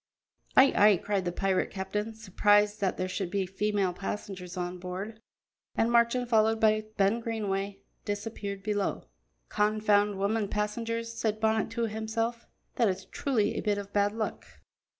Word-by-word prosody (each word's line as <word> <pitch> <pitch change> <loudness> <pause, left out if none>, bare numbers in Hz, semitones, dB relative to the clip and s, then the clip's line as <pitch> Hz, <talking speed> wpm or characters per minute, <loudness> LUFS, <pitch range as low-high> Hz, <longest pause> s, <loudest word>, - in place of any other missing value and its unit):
"Ay, 270 +1 +7
ay!" 205 -2 +6
cried 195 +1 -1
the 175 - 0
pirate 190 +1 0
captain, 210 +3 -3
surprised 205 0 +2
that 190 -2 0
there 185 - -1
should 185 0 -3
be 195 0 0
female 195 0 0
passengers 185 -1 -6
on 180 0 -3
board, 190 +5 -6 0.5
and 230 +1 +2
Marchand, 235 +1 +3
followed 220 -1 +3
by 215 -1 +3
Ben 200 +4 +3
Greenway, 200 -4 -3 0.2
disappeared 205 -1 -4
below. 205 -1 -1 0.5
"Confound 210 -1 +2
women 205 +2 0
passengers," 230 +3 -2
said 215 -2 -1
Bonnet 220 0 +1
to 230 +1 -2
himself; 225 +2 -3 0.3
"that 230 -4 +4
is 185 - -3
truly 225 -7 0
a - - -2
bit 210 -2 0
of 200 0 -7
bad 205 0 +3
luck." 220 0 -3
210 Hz, 150 wpm, -29 LUFS, 195-220 Hz, 0.5 s, Ay